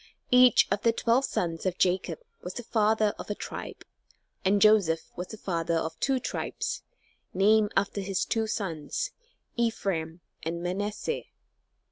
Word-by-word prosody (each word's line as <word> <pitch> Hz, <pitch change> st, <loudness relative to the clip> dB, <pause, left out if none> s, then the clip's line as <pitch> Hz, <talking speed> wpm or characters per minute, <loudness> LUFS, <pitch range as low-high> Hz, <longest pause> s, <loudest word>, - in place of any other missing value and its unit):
Each 250 Hz, 0 st, +7 dB
of 200 Hz, -, +1 dB
the 230 Hz, -, +4 dB
twelve 240 Hz, +4 st, +2 dB
sons 165 Hz, -8 st, -2 dB
of 185 Hz, -1 st, -1 dB
Jacob 180 Hz, -3 st, +1 dB, 0.2 s
was 180 Hz, +1 st, -6 dB
the 240 Hz, -, -5 dB
father 215 Hz, -1 st, +2 dB
of -, -, -7 dB
a 205 Hz, -, -1 dB
tribe, -, -, -7 dB, 0.6 s
and 200 Hz, +2 st, +3 dB
Joseph 195 Hz, -6 st, +4 dB
was 180 Hz, +1 st, -5 dB
the 220 Hz, -, -9 dB
father 170 Hz, -4 st, -1 dB
of 160 Hz, 0 st, -2 dB
two 270 Hz, -1 st, +1 dB
tribes, -, -, -3 dB, 0.5 s
named 210 Hz, +2 st, +4 dB
after 200 Hz, +1 st, +1 dB
his 195 Hz, -1 st, -1 dB
two 225 Hz, -1 st, 0 dB
sons, 200 Hz, -, -3 dB, 0.5 s
Ephraim 180 Hz, -8 st, -1 dB, 0.2 s
and 170 Hz, +1 st, -4 dB
Manasseh. 205 Hz, -, -2 dB
200 Hz, 145 wpm, -28 LUFS, 175-220 Hz, 0.6 s, Each